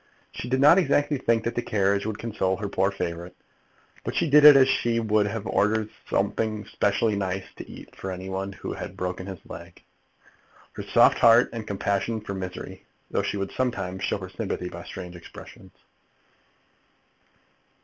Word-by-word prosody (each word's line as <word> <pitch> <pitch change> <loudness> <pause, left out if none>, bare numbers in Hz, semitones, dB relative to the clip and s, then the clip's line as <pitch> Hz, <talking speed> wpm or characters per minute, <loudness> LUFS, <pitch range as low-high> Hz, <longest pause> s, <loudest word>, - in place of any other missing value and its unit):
She 125 - -7
did 130 +1 +1
not 150 +7 +7
exactly 145 -5 +1
think 115 -2 +1
that 115 - -2
the 120 - -1
carriage 100 -2 0
would 110 -1 -3
console 95 -5 -1
her 105 - -4
poor 95 0 +1
favourite; 90 -2 -5 0.7
but - - -4
she - - +1
did 150 0 +6
it 150 -1 +11
as 130 -1 +6
she 120 -3 +1
would 110 -2 +2
have 110 0 -4
ordered 105 +3 +1 0.2
something 110 -2 -1
specially 105 +2 0
nice 95 -1 -2
to - - -9
eat - - -12
for 95 - -6
any 95 0 -6
one 95 +1 -3
who 95 - -6
had - - -7
broken 90 0 -4
his 95 -1 -6
leg. - - -11 0.9
Her - - -6
soft - - +4
heart 115 +1 +6
had 115 -2 -6
compassion 100 +3 -1
for 105 -2 -6
misery, 95 -1 -7 0.3
though - - +1
she - - -3
would 100 0 -3
sometimes 95 -8 -2
show - - 0
her - - -8
sympathy 90 - -4
by 85 0 -9
strange 90 -2 -8
expressions. 85 - -13
100 Hz, 175 wpm, -25 LUFS, 95-115 Hz, 0.9 s, it